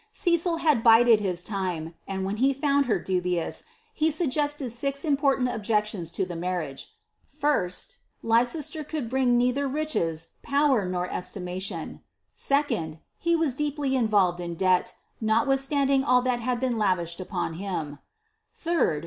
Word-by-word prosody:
Cecil 340 -2 +1
had 305 -8 +2
bided 230 -1 +6
his 180 -4 -2
time; 180 -6 -3
and 190 -1 -3
when 200 +2 -2
he 270 +4 +3
found 280 0 +1
her 210 -6 +2
dubiow 180 -2 -2 0.3
he 315 -4 +2
suggested 295 -4 -1
six 275 +5 -2
important 275 -3 +2
objections 210 -5 -1
to 185 +3 -1
the 180 -1 -7
marriage.* 170 -5 -4 0.5
1st. 180 -12 0 0.3
Leiccsle 255 +6 +1
could 300 -7 -3
bring 255 -2 +3
neither 250 +3 +1
riches, 255 - -2
power, 280 -8 +2
nor 180 0 -2
estimation. 180 +1 -4 0.3
2nd. 235 - 0 0.2
He 340 0 +2
was 320 -5 +1
deepl] 290 0 -1
involved 205 -8 +2
in 170 -1 -4
debt, 185 +1 +1 0.3
notwithstanding 270 +4 +2
all 250 -2 +3
that 250 -1 0
had 245 +1 -1
been 250 -3 -1
lavished 175 -4 0
upon 185 -2 -3
bin 160 -7 -4 0.6
Srd. 340 0 0
235 Hz, 140 wpm, -26 LUFS, 185-280 Hz, 0.6 s, bided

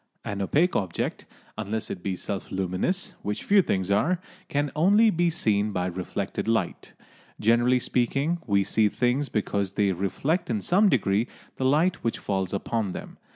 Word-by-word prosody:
An 100 -1 -3
opaque 155 - +2
object, 95 -5 -2 0.3
unless 110 +1 -3
it 90 - -5
be 95 0 -2
self 100 +1 -5
luminous, 95 - -1
which 105 +1 -3
few 200 0 +5
things 95 - -1
are, 170 - +2 0.3
can 145 0 0
only 205 +8 +5
be 175 -1 +2
seen 105 -9 +1
by 90 -2 -1
reflected 95 +3 -3
light. 110 -6 -1 0.5
Generally 120 +3 +3
speaking, 135 +9 0
we 100 -2 +3
see 105 +2 +2
things 125 +6 0
because 100 -2 -1
they 100 -1 +2
reflect 100 - -1
in 110 -3 0
some 195 - +3
degree 110 - +2 0.3
the 130 - -1
light 160 +7 +2
which 115 - 0
falls 95 -2 -2
upon 100 0 -2
them. - - -8
110 Hz, 160 wpm, -26 LUFS, 100-145 Hz, 0.5 s, few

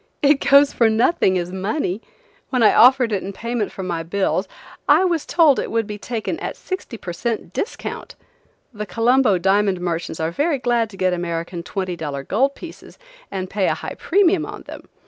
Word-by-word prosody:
It 285 0 +4
goes 280 +1 +5
for 230 -2 +3
nothing 220 - +2
as 175 0 -3
money. 195 - -2 0.5
When 250 -3 +1
I 215 - +6
offered 250 0 +6
it 200 -3 0
in 195 - -6
payment 230 0 -3
for 190 - -7
my 170 -2 -3
bills 190 +2 -1 0.4
I 305 +5 +6
was 340 -4 -1
told 315 -6 +4
it - - -3
would 225 -1 0
be 210 0 -7
taken 235 +8 -4
at - - -5
sixty 370 -10 -6
per 175 -5 -7
cent 215 -1 -3
discount. 400 - -5 0.6
The 210 -1 -6
Colombo 235 -2 +3
diamond 195 +1 +2
merchants 170 -2 -3
are 160 +1 -1
very 290 - 0
glad 240 -3 0
to 195 - -13
get 185 -1 +1
American 170 0 -4
twenty 185 0 -4
dollar 145 -4 -5
gold 270 - +1
pieces - - -11 0.3
and 190 -1 -4
pay 195 0 0
a - - +1
high - - -6
premium 370 -2 +2
on - - -8
them. - - -11
210 Hz, 190 wpm, -21 LUFS, 185-260 Hz, 0.6 s, I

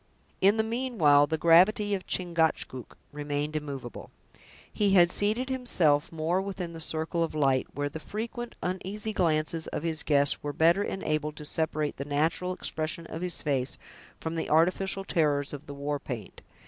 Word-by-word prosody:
In 200 +3 +5
the 220 - +3
meanwhile, 220 - +3
the 160 - -1
gravity 185 +6 +5
of 190 -2 -3
Chingcachgook 165 -8 -1
remained 145 +1 -3
immovable. 140 -5 -6 0.6
He 205 -2 +2
had 175 -1 +6
seated 220 +7 0
himself 175 - +2
more 165 +3 0
within 190 -3 -5
the 165 - -8
circle 160 +1 -2
of 165 - -4
light, 135 -3 +2
where 145 +1 -1
the 150 +3 -6
frequent, 230 - -5
uneasy 195 +4 -3
glances 160 -3 +1
of - - -4
his 165 -1 -1
guests 145 -1 +2
were 145 0 -4
better 170 +6 +4
enabled 155 -6 -2
to 150 - -9
separate 155 -1 -1
the 140 - -4
natural 160 +5 0
expression 165 -1 -4
of 165 - -7
his 180 -1 -2
face 135 -3 -1 0.4
from 160 - -4
the 165 - -3
artificial 190 +4 +2
terrors 145 -5 +1
of 145 - -8
the 140 - -7
war 145 +1 -2
paint. 120 -7 -7
160 Hz, 165 wpm, -28 LUFS, 145-190 Hz, 0.6 s, had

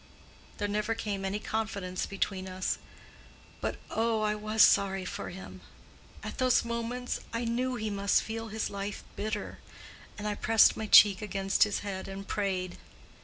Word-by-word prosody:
There 205 - -1
never 210 +2 -1
came 205 -3 -3
any 195 +1 -1
confidence 205 -4 -3
between 195 -1 -2
us; 185 0 -2 0.8
but - - -2
oh, 225 0 +1
I 210 0 +2
was 215 0 +3
sorry 195 -1 +4
for - - -5
him. 190 +2 -9 0.6
At - - -6
those 255 -2 +3
moments 235 +2 -3
I 230 +1 -2
knew 250 +2 0
he 215 -2 -3
must 200 0 +2
feel 225 0 -5
his 220 0 -3
life 200 0 -5
bitter, 210 -1 -4 0.6
and 210 0 -4
I 210 - 0
pressed 225 +1 +5
my 220 - -4
cheek 205 -2 +8
against 195 -1 +2
his 210 - -2
head 190 -2 -4
and 195 0 -7
prayed. 185 -3 -2
210 Hz, 160 wpm, -30 LUFS, 195-225 Hz, 0.8 s, cheek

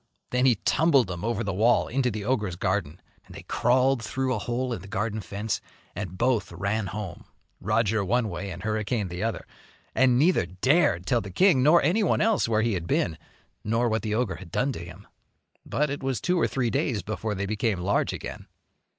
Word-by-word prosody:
Then 125 +1 +3
he 125 - +5
tumbled 145 -1 +3
them 90 -2 -6
over 115 0 -1
the 100 -2 -2
wall 115 +6 +3
into 130 0 0
the 105 -2 -5
ogre's 105 -7 0
garden. 90 -3 -2 0.3
And - - -13
they - - -9
crawled 130 +1 +2
through 130 +3 -1
a 115 - -1
hole 120 +3 -2
in 105 - -5
the 100 - -11
garden 110 +2 -2
fence 105 +3 -3 0.3
and 95 -2 -5
both 115 -3 +1
ran 100 +4 -2
home, 100 -4 -6 0.3
Roger 110 0 +1
one 115 +4 +1
way 95 0 -5
and 90 0 -7
Hurricane 110 -1 -1
the 90 +1 -5
other, 115 +1 -2 0.5
and 130 -2 +4
neither 155 - +3
dared 130 - +2
tell 120 +3 +2
the 100 - -8
king 160 - +4
nor 155 +6 +5
anyone 190 +8 +2
else 220 - +2
where 110 -1 +2
he 115 -1 +1
had 85 -3 -3
been, 80 - +1 0.5
nor 115 +3 +1
what 110 0 0
the 110 -1 -2
ogre 120 -3 -1
had 90 -3 -12
done 135 - +1
to 85 - -6
him. 85 +4 -11 0.6
But 150 -1 0
it 145 - -4
was 135 -2 -1
two 180 -1 +1
or - - +3
three 125 -4 -1
days 135 - 0
before 105 +1 -3
they 100 +1 -2
became 105 -1 -1
large 95 +3 +1
again. - - -7
110 Hz, 205 wpm, -26 LUFS, 100-130 Hz, 0.6 s, he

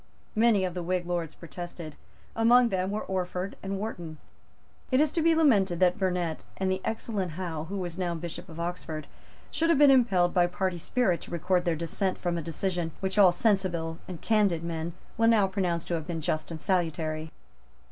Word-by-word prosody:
Many 215 -3 +4
of 180 - -3
the 180 - -3
Whig 180 +1 -1
Lords 170 -3 -3
protested. 170 -1 -8 0.4
Among 235 +2 +5
them 185 -1 -1
were 210 +2 -2
Orford 185 0 -3
and 195 0 -3
Wharton. 175 -7 -5 0.7
It 255 - +3
is 305 -1 +3
to 330 - 0
be 330 0 +4
lamented 200 - +3
that 180 +2 +3
Burnet, 180 -4 -1
and 190 -1 0
the 190 0 -1
excellent 205 -6 -2
Hough, 165 -3 -4
who 200 +3 -4
was 175 -1 -4
now 175 -2 -1
Bishop 170 0 -6
of 165 0 -9
Oxford, 170 -2 -4 0.5
should 330 +1 +1
have 335 - +5
been 285 -1 +7
impelled 195 -9 +4
by 175 -1 +4
party 180 0 -2
spirit 190 -2 +1
to - - -10
record 175 +2 +1
their 170 -2 +1
dissent 170 +4 -2
from 175 -1 -2
a 170 - -2
decision 170 +1 -2
which 190 +1 -1
all 190 -3 +8
sensible 175 -4 0
and 180 -3 -7
candid 205 -7 +2
men 165 0 -3 0.3
will 225 - +5
now 220 -3 +5
pronounce 185 -3 -1
to - - -3
have 160 -2 -2
been 170 -2 -3
just 155 0 -2
and 165 -2 -6
salutary. 160 -3 -1
180 Hz, 195 wpm, -28 LUFS, 170-200 Hz, 0.7 s, all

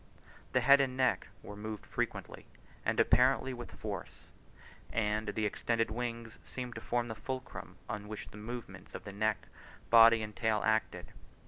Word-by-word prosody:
The - - +4
head 140 +1 +7
and 130 -1 -1
neck 130 -1 +2 0.2
were 105 - -8
moved 105 +1 -6
frequently, - - -4 0.4
and - - 0
apparently 130 +1 +4
with 120 -1 -7
force; - - -6 0.6
and 110 -1 0
the 105 +1 -1
extended 115 +2 0
wings 115 -1 -4
seemed 125 -2 -6
to 110 - -7
form 120 +2 0
the 110 - -4
fulcrum 130 +4 -6
on 105 0 -4
which 110 0 -7
the - - -11
movements 120 +2 -7
of - - -6
the 100 - -8
neck, 110 +1 0 0.5
body, 115 -1 +8
and 105 -1 -7
tail 110 -2 +1
acted. 110 0 0
115 Hz, 160 wpm, -33 LUFS, 110-120 Hz, 0.6 s, body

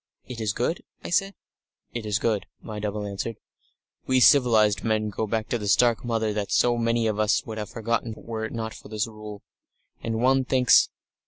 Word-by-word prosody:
"It 120 -3 -7
is 110 -2 0
good?" 125 +10 -1 0.2
I - - -6
said. 195 +2 +1 0.6
"It 115 -2 -4
is 105 0 +1
good," 110 -3 -1
my 105 -1 -7
double 105 0 -3
answered. 100 +3 -4 0.7
"We 130 0 +3
civilised 115 -7 +5
men 110 -1 0
go 110 +2 -2
back 110 0 -2
to 120 - -1
the 105 - -4
stark 120 +2 +3
Mother 115 -3 -1
that 105 -1 -3
so 120 -1 +3
many 115 0 +1
of 110 -1 -1
us 105 -1 +2
would 110 -1 -6
have 105 - -5
forgotten 115 0 -2
were 110 -1 -5
it - - -6
not 110 -2 -4
for - - -12
this 105 -1 -1
Rule. 105 -2 -10 0.6
And 115 -1 -2
one 130 +2 +3
thinks.... 130 -1 +4
110 Hz, 195 wpm, -25 LUFS, 105-120 Hz, 0.7 s, civilised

